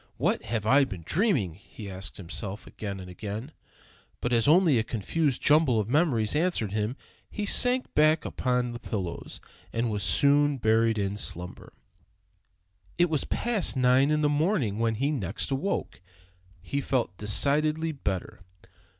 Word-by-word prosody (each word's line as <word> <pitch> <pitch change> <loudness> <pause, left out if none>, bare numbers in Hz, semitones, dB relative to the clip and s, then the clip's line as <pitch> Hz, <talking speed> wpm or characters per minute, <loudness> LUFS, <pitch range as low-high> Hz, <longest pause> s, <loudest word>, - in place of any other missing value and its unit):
"What - - 0
have 110 -3 -2
I 135 +5 +5
been 95 -10 -6
dreaming?" 155 - +1
he 100 +4 -12
asked 95 0 -6
himself 95 +3 -6
again 100 -2 -6
and 90 - -9
again. 105 - -6 0.7
But 120 - -1
as 115 +1 +3
only 160 -5 +5
a - - +1
confused 125 - -1
jumble 145 -6 +4
of 105 - -1
memories 140 -7 +2
answered 155 - 0
him, 105 +3 -2 0.3
he 210 - -4
sank 250 +5 +2
back 155 +1 +3
upon 125 -1 -1
the 120 - -7
pillows, 95 -8 -5 0.3
and 115 0 -1
was 105 -1 -2
soon 145 - +3
buried 115 -1 +2
in 100 0 -2
slumber. 90 -3 -5 1.3
It 175 -1 +3
was 155 - 0
past 225 - -1
nine 125 +1 +4
o'clock 150 - +1
in 150 - 0
the 150 - +3
morning 145 - 0
when 115 -1 +1
he 140 +6 0
next 100 - -2
awoke. 135 - -2 0.6
He 140 - -2
felt 125 -9 -1
decidedly 150 +10 +1
better. 100 - -4
120 Hz, 155 wpm, -27 LUFS, 105-150 Hz, 1.3 s, I